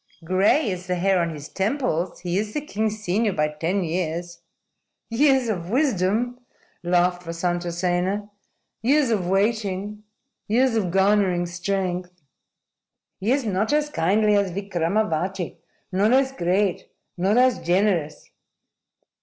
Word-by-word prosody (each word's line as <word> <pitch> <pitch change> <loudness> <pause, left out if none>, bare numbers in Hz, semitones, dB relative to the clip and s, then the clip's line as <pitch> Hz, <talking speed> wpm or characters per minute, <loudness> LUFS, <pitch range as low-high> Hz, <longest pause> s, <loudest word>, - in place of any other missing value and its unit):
"Gray 195 - +3
is 180 0 -6
the 180 - 0
hair 190 +1 +2
on 170 - 0
his 150 -2 -7
temples. 195 - -2
He 175 -1 -2
is 210 0 -4
the 300 - 0
king's 215 -2 -2
senior 210 +3 +1
by 150 -2 +1
ten 165 +6 -1
years." 170 0 -3 0.7
"Years 265 +1 +3
of 180 -6 -3
wisdom," 245 - +1 0.4
laughed 175 0 +1
Vasantasena. 175 +3 -1 0.5
"Years 270 +2 +3
of 195 -5 0
waiting. 205 0 -1 0.5
Years 250 +3 +3
of 205 -5 0
garnering 190 -1 +2
strength." 180 -1 -3 1.0
"He 210 +5 0
is 270 -1 +1
not 210 +2 0
as 300 0 +1
kindly 210 - +2
as 200 -1 +2
Vikramavati, 185 -1 -2 0.3
nor 200 +4 +2
as 265 0 +3
great, 185 -3 0 0.3
nor 195 +5 +1
as 255 0 +4
generous." 175 -4 0
190 Hz, 125 wpm, -23 LUFS, 175-215 Hz, 1.0 s, as